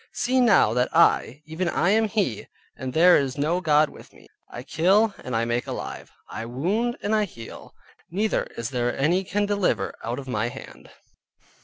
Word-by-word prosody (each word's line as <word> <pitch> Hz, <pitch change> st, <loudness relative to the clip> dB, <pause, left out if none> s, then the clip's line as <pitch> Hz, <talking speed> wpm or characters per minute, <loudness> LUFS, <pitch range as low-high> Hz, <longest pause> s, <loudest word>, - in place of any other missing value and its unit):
See 255 Hz, +1 st, +1 dB
now 200 Hz, -, +4 dB
that 125 Hz, +1 st, +1 dB
I, 150 Hz, -4 st, +3 dB
even 165 Hz, +3 st, -3 dB
I 175 Hz, +3 st, +1 dB
am 220 Hz, +1 st, +3 dB
he, 200 Hz, -, -2 dB, 0.3 s
and 130 Hz, 0 st, -5 dB
there 175 Hz, +5 st, +6 dB
is 135 Hz, -1 st, -2 dB
no 160 Hz, +5 st, 0 dB
god 150 Hz, -2 st, +4 dB
with -, -, -15 dB
me, -, -, -18 dB, 0.2 s
I 120 Hz, -, -8 dB
kill 190 Hz, +9 st, +2 dB
and 125 Hz, -, -4 dB
I 115 Hz, +1 st, +1 dB
make 120 Hz, 0 st, -2 dB
alive, -, -, -6 dB, 0.2 s
I 115 Hz, +1 st, -6 dB
wound 200 Hz, -, -1 dB
and 205 Hz, -, 0 dB
I 215 Hz, -1 st, +2 dB
heal, 115 Hz, -, -12 dB, 0.3 s
neither 210 Hz, +5 st, 0 dB
is 115 Hz, +1 st, -4 dB
there 120 Hz, -1 st, -1 dB
any 170 Hz, +7 st, +1 dB
can 205 Hz, +2 st, -1 dB
deliver 205 Hz, -2 st, 0 dB
out 120 Hz, +2 st, -3 dB
of 135 Hz, -1 st, -8 dB
my 120 Hz, -2 st, -1 dB
hand. -, -, -12 dB
160 Hz, 185 wpm, -24 LUFS, 125-205 Hz, 0.3 s, there